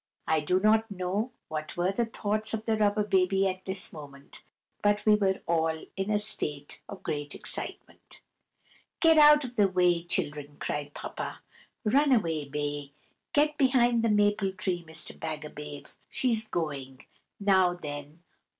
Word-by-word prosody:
I 160 0 +3
do 180 +5 +1
not 220 +2 +3
know 200 +5 -2 0.2
what 155 +1 -5
were 180 +2 +1
the 230 +3 -1
thoughts 215 0 -1
of 220 0 -7
the 225 - +1
Rubber 210 0 +2
Baby 195 -1 +2
at 185 0 -4
this 190 0 +1
moment, 140 -3 -12 0.4
but 205 0 +1
we 215 - +6
were 195 -2 +1
all 160 -1 +1 0.2
in 195 +1 -2
a 210 - +3
state 150 -9 -2
of 200 - -9
great 145 -1 -3
excitement. - - -5 0.8
"Get 325 -2 +6
out 300 0 +8
of 245 -1 -8
the 205 -2 +5
way, 180 -2 +2
children!" 145 -4 -3
cried 145 0 -4
Papa. - - -6 0.4
"Run 275 +6 +3
away, 165 - +1
Bay! 145 -1 -3 0.4
Get 300 +1 +2
behind 245 -3 +4
the 230 - +1
maple 205 -2 +2
tree, 185 -3 -2
Mr. 160 -1 -2
Bagabave! 150 -2 -7 0.2
She's 225 -4 +1
going. 140 -8 -4 0.3
Now, 190 -3 +3
then! 150 0 -8
190 Hz, 150 wpm, -28 LUFS, 155-215 Hz, 0.8 s, out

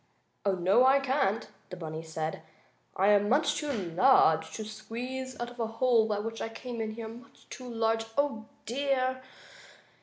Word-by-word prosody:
"Oh, 200 - +2
no, 185 +7 +4
I 265 +2 +6
can't!" 260 -6 0 0.2
the 180 - -6
bunny 160 -2 -5
said. 160 -1 -4 0.5
"I 195 +2 +3
am 205 0 +4
much 285 +6 +3
too 300 -1 -2
large 170 - +3
to 220 - -5
squeeze 255 +4 -6
out 240 0 -4
of 245 - -14
the 230 -2 -1
hole 225 0 +3
by 210 -2 0
which 225 +2 -4
I - - -2
came 230 +1 -6
in 220 -1 -3
here. 225 -1 -6
Much 240 +5 -13
too 255 -2 -8
large. 225 0 +1
Oh, 280 -7 0 0.2
dear!" 260 0 0
225 Hz, 175 wpm, -29 LUFS, 205-255 Hz, 0.5 s, I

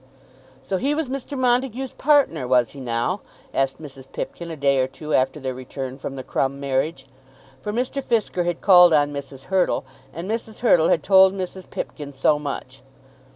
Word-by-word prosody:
"So 190 +8 -1
he 280 +9 0
was 310 -4 -2
Mr. 275 +1 -5
Montague's 255 0 0
partner, 275 - +2
was 125 -2 +3
he 140 - -11
now?" 125 - -1 0.3
asked 135 0 0
Mrs. 135 -3 -12
Pipkin 170 -1 -5
a 165 - -5
day 140 -2 +2
or 130 - +2
two 150 +4 -6
after 130 +3 +2
their 130 -2 -3
return 130 +1 -7
from 135 - -5
the 130 - -6
Crumb 135 +1 -1
marriage. 135 +1 -1 0.6
For 210 - -3
Mr. 255 +5 -2
Fisker 215 -8 0
had 175 -1 -2
called 180 -3 +7
on 145 -1 +3
Mrs. 140 -1 -7
Hurtle, 185 -7 +2 0.3
and 170 +4 -6
Mrs. 220 0 -4
Hurtle 170 -9 +4
had 150 - +2
told 190 -1 +6
Mrs. 185 -1 -6
Pipkin 145 -2 -6
so 145 +2 +2
much. 135 -2 -6
155 Hz, 180 wpm, -23 LUFS, 135-205 Hz, 0.6 s, called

